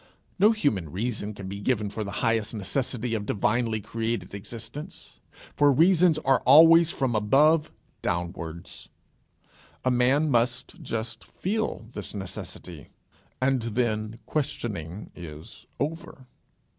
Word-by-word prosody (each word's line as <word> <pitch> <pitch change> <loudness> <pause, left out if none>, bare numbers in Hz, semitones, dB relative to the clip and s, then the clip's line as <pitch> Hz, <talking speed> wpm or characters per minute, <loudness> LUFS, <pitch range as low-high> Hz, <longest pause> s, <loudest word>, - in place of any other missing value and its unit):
No 205 +3 +7
human 110 - 0
reason 105 +1 -3
can 100 -2 -7
be 100 +1 -5
given 105 -2 0
for 110 - -3
the 100 - -6 0.2
highest 115 0 +1
necessity 120 +3 -2
of 105 -2 -2
divinely 115 +1 +1
created 110 -2 -3
existence. 115 +7 -8 0.4
For 145 -1 +5
reasons 170 +2 +5
are 135 -1 +4
always 165 +4 +7
from 130 -6 -1
above 150 +9 +4 0.3
downwards. 85 -1 -4 1.0
A 130 - +3
man 130 +5 +3
must 125 +8 0
just 110 -5 -4
feel 215 - -3
this 105 0 -5
necessity, 90 -5 -7 0.5
and 130 -1 +2
then 110 -1 -1
questioning 105 - -4
is 80 -3 -10
over. 145 -3 -4
115 Hz, 120 wpm, -26 LUFS, 105-140 Hz, 1.0 s, No